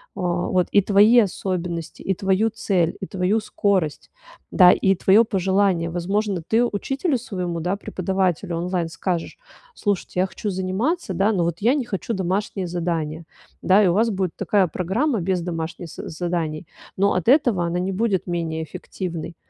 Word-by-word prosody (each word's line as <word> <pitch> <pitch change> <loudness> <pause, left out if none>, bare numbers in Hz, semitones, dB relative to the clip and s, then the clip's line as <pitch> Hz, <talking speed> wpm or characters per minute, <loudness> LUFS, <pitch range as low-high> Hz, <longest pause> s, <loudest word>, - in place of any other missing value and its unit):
а, 195 - -5
вот 175 0 0
и 200 - +5
твои 210 +5 +5
особенности, 180 -5 -2
и 190 - 0
твою 195 +4 +1
цель, 190 -7 0
и 190 - -4
твою 190 +3 0
скорость, 195 -7 -1 0.4
да, 180 -2 +7
и 195 - +3
твоё 200 +6 +5
пожелание. 190 -4 +1
Возможно, 190 +2 -1
ты 225 +2 +3
учителю 270 - -1
своему, 180 -8 -4
да, 180 +4 -1
преподавателю 185 -2 -1
онлайн 175 -1 -2
скажешь: 170 0 -3 0.3
"Слушайте, 200 - -2
я 185 - +2
хочу 205 +2 -4
заниматься, 190 - -1
да, 195 +4 +2
но 180 - +1
вот 170 0 -2
я 240 +5 +4
не 285 -4 0
хочу 210 +2 -3
домашнее 190 0 -2
задание". 165 -2 -3 0.4
Да, 200 +3 +5
и - - +4
у 175 - +3
вас 225 +4 +2
будет 185 -3 -2
такая 200 -1 +2
программа 210 - -1
без 185 0 0
домашних 165 0 -5
з - - -8
заданий, 165 -1 -3 0.3
но 200 +1 +3
от 180 - -2
этого 245 - +4
она 170 +1 -1
не 185 +2 -1
будет 195 -1 0
менее 165 -2 -2
эффективной. 170 +1 -6
185 Hz, 165 wpm, -22 LUFS, 175-205 Hz, 0.4 s, да